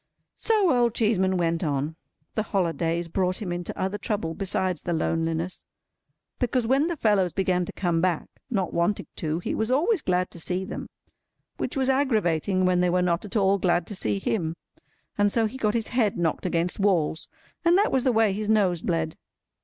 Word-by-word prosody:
So 415 - +2
Old 240 -2 +2
Cheeseman 190 -4 +2
went 170 -1 0
on. 145 0 -1 0.4
The 215 - 0
holidays 170 -4 -1
brought 185 +2 0
him 195 -5 -4
into 175 0 -4
other 190 +2 -1
trouble 200 -5 -2
besides 185 -2 -1
the 175 - -2
loneliness; 165 +2 -1 0.8
because 250 -1 +1
when 270 +6 +3
the 345 - -2
fellows 200 - +2
began 180 -2 +1
to - - -7
come 170 -3 0
back, 180 -3 0 0.2
not 195 -8 -1
wanting 170 +4 0
to, 155 -1 -1
he 175 - -3
was 220 +1 -1
always 325 - +2
glad 180 0 0
to 170 - -11
see 180 +3 -2
them; - - -6 0.7
which - - -3
was 265 -1 +1
aggravating 200 - +2
when 180 -1 +3
they 180 - +3
were 180 +1 +2
not 175 +2 0
at 205 - -9
all 200 -1 +3
glad 175 -2 +2
to 205 - -7
see 105 - -1
him, 160 - -1 0.6
and 205 0 +4
so 230 +1 +2
he 220 +4 -4
got 220 -4 0
his 225 -2 -1
head 235 -5 +1
knocked 170 +1 0
against 175 +1 0
walls, 175 -5 +1 0.4
and 345 +1 +5
that 410 - +3
was 265 -2 +2
the 260 - +3
way 220 -3 +3
his 210 +1 -3
nose 190 -6 +3
bled. 160 -2 -1
185 Hz, 195 wpm, -26 LUFS, 170-220 Hz, 0.8 s, and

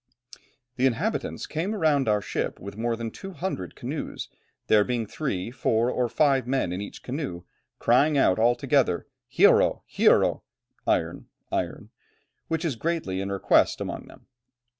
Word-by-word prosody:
"The 130 +1 +4
inhabitants 180 - -2
came 180 +8 -2
around 150 - +2
our 105 -1 +2
ship - - -3
with 100 +1 -8
more 115 +1 -1
than 115 -1 -5
200 185 - -5
canoes, - - -5 0.4
there 105 -1 +5
being 120 0 -1
three, 105 -5 -3
four, 120 -1 +1
or 125 -2 0
five 135 0 +2
men 130 -9 0
in 95 - -3
each 100 - -8
canoe, 130 - -4 0.3
crying 140 +5 +3
out 95 -7 +3
all 120 +2 +4
together: - - +1 0.3
'Hierro, - - +4
hierro' - - +3 0.5
(iron, - - 0 0.2
iron), - - -3 0.6
which 160 +1 -1
is 150 -7 0
greatly 115 - -2
in 100 0 -3
request 100 - +3
amongst - - -5
them. - - -16
125 Hz, 145 wpm, -26 LUFS, 105-150 Hz, 0.6 s, there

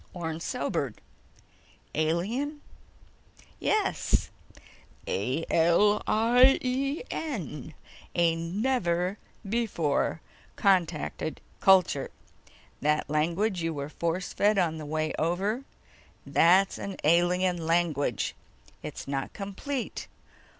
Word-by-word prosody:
Orne 165 -2 -4
sobered. - - -2 0.9
"Alien?" 210 - -1 1.0
"Yes. 420 -2 +1 0.8
A 130 +11 -1
L 170 +6 +4
I 245 +4 +5
E 275 - -1
N! 160 - -5 0.4
A 170 -1 +3
never 180 0 0 0.3
before 195 -10 0 0.4
contacted 175 -5 +1 0.2
culture. 185 -7 +4 0.7
That 150 0 +1
language 170 +6 +1
you 165 -1 -1
were 140 0 -4
force 170 +3 -2
fed 210 0 +3
on 165 -4 +1
the 150 - -7
way 155 +1 -1
over, 195 - 0 0.6
that's 185 +3 +4
an 195 -1 -5
alien 175 +1 +2
language. 155 - +1 0.5
It's - - -7
not 135 -1 -3
complete 220 +7 -5
175 Hz, 90 wpm, -28 LUFS, 160-210 Hz, 1.0 s, I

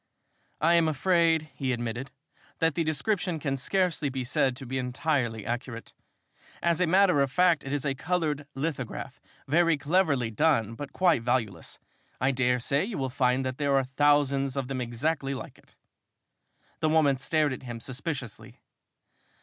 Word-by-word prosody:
"I 165 +3 +4
am 170 -1 +4
afraid," 160 0 +2
he 135 -2 -2
admitted, 120 +2 -3 0.5
"that 165 -1 +2
the 165 - 0
description 175 +2 0
can 140 -3 -2
scarcely 165 +1 0
be 130 -1 -3
said 125 +1 +1
to 135 - -9
be 130 +1 -3
entirely 125 -3 -1
accurate. 120 0 -5 0.7
As 170 0 +1
a 180 - +3
matter 180 -3 +4
of 135 -2 +1
fact, 180 -2 +3
it 135 - -6
is 145 -1 -2
a 140 - +1
colored 150 -1 -2
lithograph, 135 -3 -4 0.3
very 165 +2 +3
cleverly 145 -6 +1
done 115 -4 +2
but 140 +4 -7
quite 175 -9 +3
valueless. 115 -7 -2 0.4
I 130 +2 +2
dare 125 -1 +1
say 140 +4 +1
you 205 0 -4
would 130 -2 -3
find 130 -1 +1
that 130 +1 -4
there 140 -1 +2
are 135 - +3
thousands 140 0 +2
of 135 -2 -2
them 130 -2 -2
exactly 135 +4 -2
like 130 - -9
it." - - -24 1.0
The 155 - +1
woman 150 -4 +3
stared 150 -1 +1
at - - -7
him 120 -3 -7
suspiciously. 135 -1 -6
140 Hz, 165 wpm, -28 LUFS, 130-160 Hz, 1.0 s, I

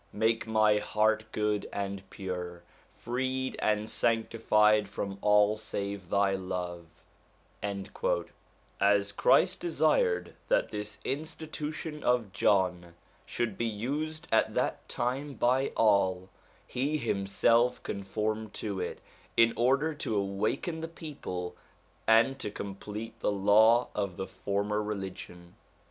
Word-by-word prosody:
make 115 +1 +1
my 110 -1 +4
heart 110 +1 +1
good 105 -1 -1
and 100 -1 -3
pure, 90 -3 -5 0.3
freed 130 +2 -2
and 105 0 +1
sanctified 110 -2 +2
from 100 0 -4
all 105 0 +4
save 100 -3 -5
thy 100 -1 +3
love/ 90 -2 -4 1.9
As 100 0 +3
Christ 180 - +3
desired 150 - +1
that - - +2
this 105 0 -5
institution 155 +1 -5
of 120 -6 +1
John 90 -4 +1 0.3
should 110 -5 -2
be 115 - +1
used 150 +9 -3
at 110 - +3
that - - -1
time 135 +3 -2
by 130 +3 +2
all, 95 -4 +3 0.4
he 140 +5 -1
himself 115 +1 +2
conformed 105 +2 -3
to 100 -3 -3
it - - -4 0.4
in 115 0 +6
order 135 +6 +2
to 140 -8 -2
awaken 105 - -1
the 165 - -3
people 140 - -6 0.5
and 115 +5 +5
to 105 - -3
complete 105 +2 -7
the - - +1
law 110 +4 +5
of 100 -4 -2
the 95 - -3
former 100 +2 -2
religion. 95 -4 -6
105 Hz, 115 wpm, -30 LUFS, 100-120 Hz, 1.9 s, in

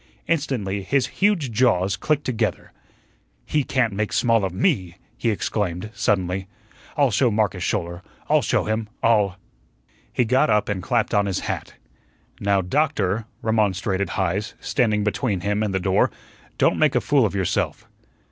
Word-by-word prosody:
Instantly 125 -11 -1
his 135 +5 +1 0.2
huge 190 - +2
jaws 105 -5 +2
clicked 150 -1 0
together. 125 -4 -2 0.7
"He 150 - +1
can't 125 -5 0
make 105 +1 -2
small 115 -3 +2
of 95 - -1
ME," 90 -1 0 0.2
he 115 - -1
exclaimed, 105 -2 -2
suddenly. 95 -1 0 0.5
"I'll 140 -4 +3
show 120 +5 +3
Marcus 105 -4 0
Schouler 85 -3 -2 0.3
I'll - - +4
show - - +1
him 110 0 -2
I'll 105 -4 +3 0.4
" - - -36
He 125 - +1
got 130 +2 +3
up 105 -1 +2
and 100 -3 -2
clapped 120 +3 0
on 100 -1 +3
his 95 - -1
hat. - - -4 0.6
"Now, 100 -1 +2
Doctor," 110 - 0 0.2
remonstrated 100 -3 0
Heise, 95 +3 -1
standing 105 -4 +1
between 105 -2 -1
him 100 +3 0
and 105 -2 0
the 95 - 0
door, 95 +1 +2 0.5
"don't - - +4
go - - -5
make - - +3
a - - +5
fool 145 -3 +3
of 100 - -7
yourself." 95 -3 -1
105 Hz, 160 wpm, -23 LUFS, 95-120 Hz, 0.7 s, a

